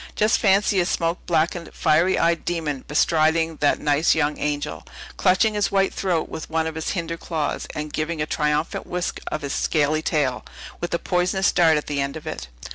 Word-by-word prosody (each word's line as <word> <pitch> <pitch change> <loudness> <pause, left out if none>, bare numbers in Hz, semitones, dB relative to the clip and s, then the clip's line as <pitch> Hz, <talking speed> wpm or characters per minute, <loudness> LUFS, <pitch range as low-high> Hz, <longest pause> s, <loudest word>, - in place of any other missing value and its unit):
Just 215 +2 +3
fancy 200 -1 +3
a 175 - +2
smoke 165 +1 -1
blackened, 170 0 0
fiery 170 +5 +3
eyed 170 0 +1
demon 155 -6 -2
bestriding 160 +1 +2
that 145 - +3
nice 150 +2 +2
young 150 -1 0
angel, 145 - -3 0.3
clutching 190 +4 +3
his 205 -1 0
white 195 -1 +2
throat 175 -4 -1
with 160 - -7
one 160 0 0
of 160 - -3
his 160 0 -4
hinder 165 -1 -3
claws; 160 -3 -3
and 150 0 -5
giving 155 +1 -2
a 150 - 0
triumphant 150 0 -1
whisk 180 0 -3
of 155 - -3
his 140 - -3
scaly 155 0 +1
tail, 140 -6 0 0.4
with 175 - -4
a - - +1
poisonous 180 +3 +1
dart 165 -3 +4
at 150 - -3
the 145 -1 -2
end 140 +2 -3
of 155 - -11
it! 60 - -5
160 Hz, 195 wpm, -23 LUFS, 150-175 Hz, 0.4 s, dart